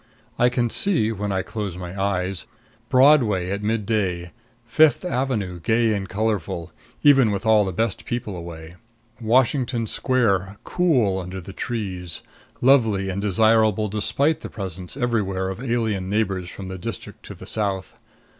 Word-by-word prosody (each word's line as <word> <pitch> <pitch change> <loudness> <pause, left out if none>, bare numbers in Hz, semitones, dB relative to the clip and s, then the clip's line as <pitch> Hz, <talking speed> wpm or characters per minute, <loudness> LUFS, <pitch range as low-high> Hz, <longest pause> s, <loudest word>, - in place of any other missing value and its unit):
I 120 - +5
can 120 -2 0
see, 165 - +1
when 105 -1 -3
I 95 -1 0
close 100 -5 -5
my 90 0 -7
eyes, 95 -1 -1 0.4
Broadway 125 -9 +4
at 100 +1 -2
midday; 105 -5 -1 0.3
Fifth 155 +9 +4
Avenue, 115 - -2
gay 110 +6 +2
and 95 -2 -3
colorful, 100 -5 -2 0.3
even 135 -5 +6
with 100 0 -3
all 110 -2 +5
the 95 - -2
best 110 +1 -2
people 115 -5 -4
away; 85 -1 -9 0.4
Washington 120 +1 +2
Square, 100 -6 0
cool 125 - +2
under 90 +1 -6
the 95 +2 -10
trees, 95 -7 -4 0.4
lovely 115 -7 +3
and 95 +1 -3
desirable 110 +1 +3
despite 140 +9 +1
the - - -7
presence 95 0 -7
everywhere 100 -7 -1
of 95 +4 -6
alien 110 -7 -1
neighbors 95 -4 -1
from 95 0 -8
the 95 0 -6
district 105 +2 -7
to - - -8
the - - -11
South. 100 -3 -3
105 Hz, 145 wpm, -23 LUFS, 95-115 Hz, 0.4 s, even